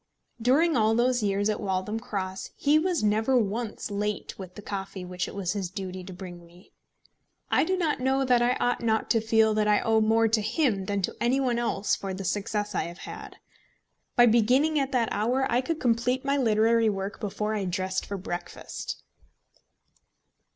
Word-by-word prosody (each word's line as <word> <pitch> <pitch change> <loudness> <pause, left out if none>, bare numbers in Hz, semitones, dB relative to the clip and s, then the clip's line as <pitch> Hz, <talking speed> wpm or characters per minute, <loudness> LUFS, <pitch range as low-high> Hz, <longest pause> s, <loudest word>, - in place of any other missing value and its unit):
During 300 +7 +3
all 220 -1 +3
those 245 +1 +2
years 200 0 +1
at 215 - 0
Waltham 195 +3 -2
Cross 190 -4 -4
he 295 +2 +3
was 350 -5 0
never 220 +5 +2
once 220 0 -2
late 210 +1 -2
with 185 -2 -9
the - - -8
coffee 195 -2 -5
which 180 0 -3
it - - -9
was 195 -2 -1
his 195 -4 -3
duty 185 0 -6
to 190 - -8
bring 175 -1 -9
me. 175 +2 -19 0.8
I - - +4
do 375 +4 0
not 320 -7 0
know 265 +1 +1
that 250 -2 +4
I 240 +1 +3
ought 245 0 0
not 220 -1 0
to 225 - +3
feel 220 0 +3
that 215 0 +1
I 210 -1 +4
owe 225 0 +2
more 225 +1 +3
to 220 0 +2
him 215 - 0
than 200 0 -2
to - - -2
any 245 +3 +2
one 245 -3 +1
else 220 -4 0
for 195 -1 -5
the 195 - -6
success 210 +2 -2
I - - 0
have 170 +1 -8
had. - - -9 0.8
By 240 - +7
beginning 250 +7 +3
at 275 -1 -1
that 240 -4 +1
hour 245 +6 +1
I 240 +2 +3
could 320 +4 -3
complete 250 +2 +1
my 275 0 +2
literary 225 -2 +3
work 195 0 -4
before 210 +1 -2
I 205 -3 -1
dressed 185 +1 -2
for 200 - -4
breakfast. 175 -1 -6
220 Hz, 195 wpm, -27 LUFS, 195-245 Hz, 0.8 s, By